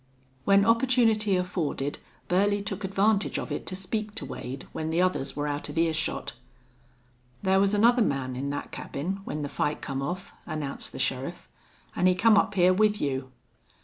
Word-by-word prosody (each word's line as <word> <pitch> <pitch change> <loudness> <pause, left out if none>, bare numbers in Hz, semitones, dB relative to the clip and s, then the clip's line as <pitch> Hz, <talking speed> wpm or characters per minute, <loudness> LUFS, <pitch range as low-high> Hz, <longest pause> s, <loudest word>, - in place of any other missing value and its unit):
When 200 0 +5
opportunity 230 -3 +3
afforded 165 -6 -2 0.3
Burley 200 +3 +2
took 205 0 -4
advantage 200 +2 +1
of - - -4
it - - -4
to 185 - -4
speak 210 +3 -4
to - - -3
Wade 130 +1 -6
when 160 0 -3
the 165 +2 0
others 180 -7 0
were 145 0 -2
out 145 0 -3
of - - -7
earshot. 165 -1 0 1.1
"Thar 190 0 +4
was 200 +1 +3
another 235 +4 +5
man 135 - 0
in 135 +2 -3
thet 145 0 -4
cabin 185 +8 -4
when 150 0 -3
the - - -2
fight 145 +1 -1
come 135 -1 -3
off," 175 +7 -4
announced 145 -3 -4
the - - -8
sheriff. - - -2 0.5
"An' 180 - +3
he 185 - +4
come 220 +3 +5
up 200 0 +2
hyar 180 0 +5
with 210 +1 +3
you." 130 -2 -2
185 Hz, 180 wpm, -27 LUFS, 145-205 Hz, 1.1 s, When